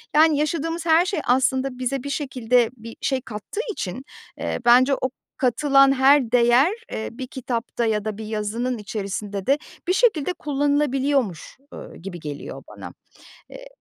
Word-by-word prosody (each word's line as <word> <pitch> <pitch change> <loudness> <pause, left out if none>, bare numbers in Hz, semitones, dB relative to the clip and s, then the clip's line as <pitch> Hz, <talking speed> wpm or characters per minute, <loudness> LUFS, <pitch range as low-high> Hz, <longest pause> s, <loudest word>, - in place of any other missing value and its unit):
yani, 310 -1 +5
yaşadığımız 330 +2 -2
her 330 +2 +5
şey 385 - -1
aslında 260 +1 +1
bize 255 +1 -2
bir 280 - -5
şekilde 250 -4 +1
bir 230 0 -10
şey 265 -2 0
kattığı 225 - -6
için, 255 - -5 0.3
eee, - - -3
bence 255 +3 +6
o 260 - -2 0.3
katılan 275 +1 +4
her 265 -2 +4
değer, 245 +6 +5 0.2
eee, 220 - -4
bir 255 +2 -7
kitapta 245 -3 -3
ya 215 -2 0
da 215 -1 -3
bir 220 - -6
yazının 220 +4 -2
içerisinde 200 -1 -5
de 275 +2 +4 0.3
bir 365 - +3
şekilde 365 - +2
kullanılabiliyormuş, 285 - 0 0.2
eee, - - -10
gibi 175 0 -8
geliyor 145 -2 -7
bana. - - -10 0.6
Eee, - - -11
260 Hz, 150 wpm, -23 LUFS, 225-290 Hz, 0.6 s, bence